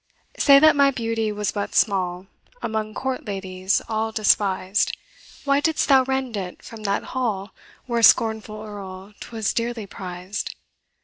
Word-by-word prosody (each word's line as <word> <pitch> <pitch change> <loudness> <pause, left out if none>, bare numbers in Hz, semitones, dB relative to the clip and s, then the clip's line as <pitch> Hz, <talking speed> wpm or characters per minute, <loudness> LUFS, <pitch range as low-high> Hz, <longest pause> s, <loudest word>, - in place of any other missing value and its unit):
Say 280 -1 +7
that 310 +2 +6
my 280 -1 +5
beauty 225 -4 -1
was 210 -1 -2
but 205 -1 -4
small, 185 -3 +1 0.4
Among 215 -1 -3
court 265 -1 -3
ladies 190 -1 -1
all 220 0 -1
despised, 200 -2 +1 0.5
Why 280 0 +3
didst 315 +1 0
thou 265 -2 +6
rend 265 -3 -2
it 185 -3 -6
from 225 -1 -10
that 200 0 0
hall 215 -6 -2 0.3
Where, 235 -2 -1
scornful 220 -2 +3
Earl, 200 -1 -9
'twas 220 -3 -3
dearly 235 -2 -2
prized? 185 +1 -6
215 Hz, 140 wpm, -23 LUFS, 195-240 Hz, 0.5 s, Say